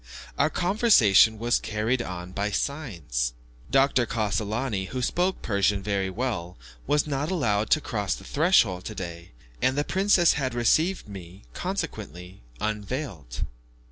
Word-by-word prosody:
Our 140 - +2
conversation 175 - +4
was 120 +2 +1
carried 110 +4 -1
on 90 -4 -6
by 100 +2 -1
signs. 85 - -2 0.4
Dr. 135 -2 +3
Cassolani, 105 -1 -1
who 130 - -4
spoke 180 +9 0
Persian 100 -1 +1
very 100 -2 -1
well, 95 -5 -3 0.3
was 150 0 +2
not 145 +1 -2
allowed 110 - 0
to 155 - +4
cross 105 -7 -2
the - - -12
threshold 140 - +3
today, 85 -5 -7 0.3
and 130 +2 +2
the 145 - +2
princess 190 0 +3
had 130 -4 -2
received 155 - +2
me, 95 -4 -10
consequently, 90 +2 -5 0.2
unveiled. 105 - -4
110 Hz, 130 wpm, -26 LUFS, 95-140 Hz, 0.4 s, conversation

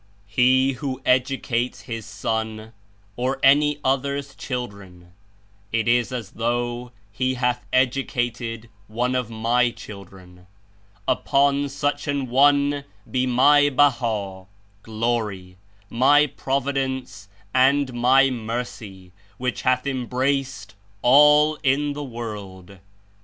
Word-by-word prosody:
"He 130 +5 +3
who 130 0 -5
educates 125 -1 0
his 115 -2 -7
son, 110 +2 -4 0.4
or 130 +2 -2
any 145 +2 +4
other's 140 +1 -1
children, 100 -9 -7 0.6
it 115 0 0
is 120 0 +2
as 120 -6 -5
though 120 +1 -2 0.2
he 130 +5 -1
hath 125 -1 -1
educated 120 -3 -1 0.2
one 120 +4 -1
of 125 -3 -1
My 115 +2 +1
children. 95 -5 -13 0.6
Upon 140 +2 +1
such 145 +2 -2
an 140 -3 -2
one 140 +2 +3 0.3
be 130 0 0
My 145 +4 +5
Baha 115 -9 0 0.3
(Glory), 110 -5 -3 0.3
My 145 +7 +4
Prov 135 -1 -2
idence 130 -7 -3 0.3
and 135 +1 +3
My 130 +3 +4
Mercy, 110 -5 -6 0.3
which 125 -1 -3
hath 130 0 +1
embraced 130 -3 -2 0.3
all 150 +4 +6
in 145 +1 +1
the 145 0 -6
world!" 100 -7 -8
125 Hz, 105 wpm, -23 LUFS, 115-135 Hz, 0.6 s, all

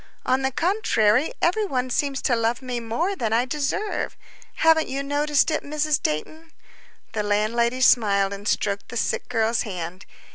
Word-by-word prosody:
On 260 +1 +2
the 265 - +1
contrary, 275 - +2
every 410 +5 +2
one 255 -5 -2
seems 275 +1 -1
to 245 - +2
love 230 +3 -1
me 250 -2 -3
more 275 - -2
than 225 - -2
I 235 +2 +2
deserve. 300 - -2 0.4
Haven't 320 -1 +4
you 275 +1 -3
noticed 290 +2 +1
it, 310 - 0
Mrs. 300 0 0
Dayton?" 315 - -3 0.6
The 215 - -2
landlady 230 +4 0
smiled 200 -6 +4
and 200 +1 -7
stroked 200 -1 -1
the 240 - -5
sick - - -1
girl's 225 +1 +1
hand. 180 -2 -6
250 Hz, 160 wpm, -24 LUFS, 220-300 Hz, 0.6 s, Haven't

